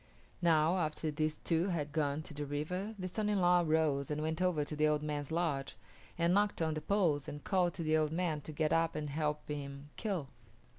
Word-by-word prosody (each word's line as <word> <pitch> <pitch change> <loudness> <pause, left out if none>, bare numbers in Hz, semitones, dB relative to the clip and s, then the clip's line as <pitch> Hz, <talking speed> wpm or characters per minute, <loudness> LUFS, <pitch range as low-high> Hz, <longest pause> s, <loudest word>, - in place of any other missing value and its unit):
Now, 165 +1 +4
after 155 -1 -1
these 155 +1 -1
two 165 +2 +1
had 155 -6 -2
gone 150 0 0
to 155 - -9
the 145 0 -4
river 180 +9 -3
the 185 -1 -3
son 210 +3 -1
in 205 -2 +2
law 180 0 +5
arose 155 -4 +1
and 150 0 -1
went 160 +2 -2
over 175 -5 +2
to 150 - -5
the 155 +1 +3
old 150 0 +1
man's 145 -2 -3
lodge, 160 -5 -1 0.4
and 170 +1 +3
knocked 205 +1 +2
on 160 -1 +1
the 155 - -3
poles 165 -6 +1
and 145 0 -6
called 180 -3 +1
to 170 - -3
the 155 0 +3
old 155 -1 +1
man 165 -3 -1
to 155 - -8
get 155 0 +1
up 165 0 +2
and 150 -2 -3
help 150 0 -1
him 140 0 -6
kill. 185 -11 -2
155 Hz, 225 wpm, -34 LUFS, 150-175 Hz, 0.4 s, law